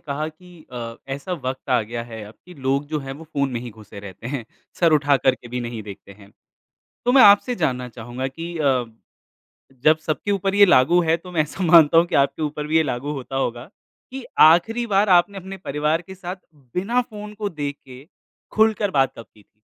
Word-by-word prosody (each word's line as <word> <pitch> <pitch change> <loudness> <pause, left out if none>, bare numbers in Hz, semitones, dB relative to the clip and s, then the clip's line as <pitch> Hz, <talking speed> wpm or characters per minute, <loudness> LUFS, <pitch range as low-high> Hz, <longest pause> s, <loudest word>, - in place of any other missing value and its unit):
कहा 150 +2 -4
कि 175 0 -17
अ, 115 -2 -6
ऐसा 140 +7 -5
वक़्त 130 -5 -5
आ 125 - +4
गया 115 +2 -5
है 115 -2 -9
अब 105 +1 -13
कि 180 - -13
लोग 140 0 -1
जो 155 0 -2
हैं 135 -1 -7
वो 150 +4 -11
फ़ोन 140 -3 -2
में 120 - -3
ही 120 0 -7
घुसे 105 -2 -12
रहते 100 +3 -10
हैं, 130 -2 -4 0.4
सर 170 -2 +4
उठाकर 140 -3 +3
के 120 - -14
भी 125 +1 -4
नहीं 120 -2 -5
देखते 100 -1 -11
हैं, 100 0 -18 0.8
तो 245 - +3
मैं 265 0 +7
आपसे 205 +5 +6
जानना 125 - -1
चाहूँगा 120 +3 -6
कि 165 +5 -7
अ, 135 -5 +1 1.0
जब 155 0 +5
सबके 155 +5 -3
ऊपर 195 0 0
ये 205 0 +8
लागू 175 +1 +4
है, 165 -1 +2
तो 180 +2 -12
मैं 165 - +2
ऐसा 150 +5 -4
मानता 165 -2 +6
हूँ 165 - +6
कि - - -2
आपके 140 +3 +1
ऊपर 150 0 -3
भी 160 +1 +2
ये 160 - +4
लागू 135 +1 -3
होता 135 -2 -6
होगा 120 +1 -3 0.4
कि 265 -1 -7
आखिरी 220 +10 +5
बार 200 -1 +2
आपने 180 +2 +4
अपने 190 +1 -8
परिवार 150 -1 -1
के 190 +2 -12
साथ 180 -1 -6 0.4
बिना 230 +7 +1
फ़ोन 210 -3 -9
को 210 -1 -3
देख 145 -4 -5
के, 130 +1 -13 0.5
खुलकर 215 -2 +2
बात 135 -5 +2
कब 115 - -9
की 105 - -21
थी? 105 - -48
150 Hz, 215 wpm, -22 LUFS, 125-180 Hz, 1.0 s, ये